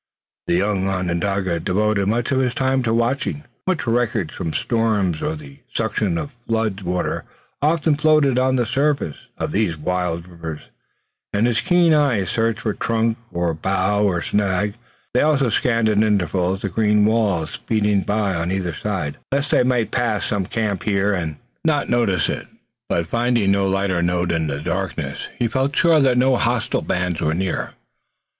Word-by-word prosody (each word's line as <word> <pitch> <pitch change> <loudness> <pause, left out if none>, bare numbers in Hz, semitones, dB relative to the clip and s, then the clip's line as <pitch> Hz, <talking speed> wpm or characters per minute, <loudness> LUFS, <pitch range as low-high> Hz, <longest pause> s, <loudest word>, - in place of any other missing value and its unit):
The - - +2
young 95 0 +1
Onondaga 90 0 -1
devoted 100 +3 +1
most 115 +4 0
of 130 - +2
his 125 -2 0
time 130 0 +1
to 115 -2 0
watching. 125 +5 0 0.2
Much 185 -7 0
wreckage 115 -6 0
from 80 - -3
storms 105 -6 0
or 155 +1 -1
the 145 -2 -12 0.2
suction 105 -5 0
of 145 - -4 0.2
flood 110 -3 0
water 90 -1 -2 0.4
often 155 +1 +2
floated 150 -3 +3
on 130 0 +2
the 120 -2 +1
surface 140 - 0 0.2
of - - -3
these 100 -6 0
wild 90 +1 -2
rivers, 85 -3 -7 0.7
and 105 +3 +1
his 115 -4 +1
keen 175 -2 +4
eyes 125 - +2
searched 115 -1 0
for 110 - -1
trunk 115 +2 0
or 85 -1 0
bough 95 +4 0
or 90 -5 +1
snag. 100 0 0 0.4
They 125 - +3
also 145 -4 +3
scanned 115 0 +2
at 105 -1 +3
intervals 95 -2 +1
the 100 - -2
green 105 +2 +3
walls 100 -8 +1
speeding 105 -3 0
by 105 -1 0
on 85 +1 -1
either 95 -3 -1
side, 90 -5 -3
lest 140 +1 0
they - - +4
might 125 -3 +1
pass 115 -4 0
some 100 -3 -1
camp 105 -5 -2
fire 100 0 +1
and 80 -5 -2 0.3
not 150 -3 +1
notice 105 -9 +2
it, - - -4 0.4
but 85 -1 +1
finding 115 0 +1
no 100 -1 +2
lighter 95 -2 0
note 90 0 +1
in 80 -2 0
the 70 -1 -3
darkness - - -3
he 120 - +1
felt 135 +4 -1
sure 170 -3 +5
that 130 -3 +3
no 130 0 +4
hostile 120 -1 0
bands 90 -2 -1
were 75 +1 +1
near. 95 0 -2
105 Hz, 170 wpm, -21 LUFS, 90-120 Hz, 0.7 s, sure